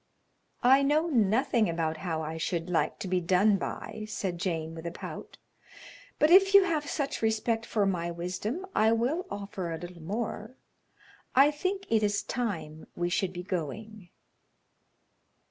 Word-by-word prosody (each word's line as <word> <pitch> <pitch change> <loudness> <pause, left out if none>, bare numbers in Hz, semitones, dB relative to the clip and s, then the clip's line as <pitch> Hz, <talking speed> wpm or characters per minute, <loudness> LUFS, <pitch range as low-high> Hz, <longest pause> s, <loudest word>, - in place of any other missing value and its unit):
"I 265 +3 +6
know 300 +4 +2
nothing 225 - +2
about 165 -1 -1
how 160 -2 -3
I 160 +1 -4
should 170 +1 -2
like 170 - +1
to - - -5
be 180 0 +1
done 190 +4 +3
by," 215 +2 -5
said 185 -5 -3
Jane, 165 -3 -2
with 165 +1 -7
a - - -3
pout, - - -8 0.8
"but 305 - +3
if 390 +2 +7
you 400 - +9
have 310 -5 -1
such 280 -2 -2
respect 225 +1 0
for 210 -3 +1
my 175 -3 -1
wisdom 185 - -4
I 220 +1 +4
will 280 +11 0
offer 195 -4 -5
a 165 - -3
little 175 +1 -9
more; 215 +5 -4 0.8
I 275 +3 +7
think 380 +6 -3
it 220 -1 +4
is 205 -1 +1
time 160 -10 -4
we 175 0 -1
should 185 +1 0
be 180 -1 -6
going." 190 +3 -5
205 Hz, 160 wpm, -29 LUFS, 175-245 Hz, 0.8 s, you